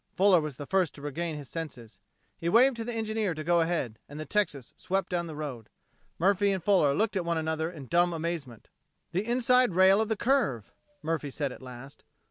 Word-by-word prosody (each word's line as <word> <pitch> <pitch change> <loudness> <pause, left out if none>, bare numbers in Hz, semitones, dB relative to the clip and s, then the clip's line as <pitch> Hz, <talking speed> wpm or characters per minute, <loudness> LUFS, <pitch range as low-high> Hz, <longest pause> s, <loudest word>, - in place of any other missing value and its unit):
Fuller 190 -3 +5
was 150 -4 -5
the 145 - -6
first 185 -1 +1
to 140 - -12
regain 160 +3 -3
his 145 -2 -8
senses. 130 -9 -7 0.4
He 170 - -3
waved 245 +6 +5
to 230 - -3
the 240 - -4
engineer 220 -4 -1
to 155 - -5
go 170 +1 +3
ahead, 160 -10 -1
and 145 +1 -8
the 155 - -5
Texas 150 - -1
swept 190 +1 -2
down 175 -1 -1
the 160 - -7
road. 135 -7 -6 0.5
Murphy 200 +3 +3
and 190 -3 -2
Fuller 175 -8 +3
looked 215 0 0
at 185 - 0
one 170 -1 -1
another 160 0 -1
in 155 -6 -9
dumb 175 +5 +2
amazement. 160 -8 -4 0.4
"The 185 +4 0
inside 245 -2 +3
rail 190 +3 +6
of 220 - 0
the 220 -1 -1
curve," 220 - 0 0.3
Murphy 155 -2 -2
said 140 0 -3
at - - -11
last. 130 +1 -11
170 Hz, 210 wpm, -28 LUFS, 145-200 Hz, 0.5 s, rail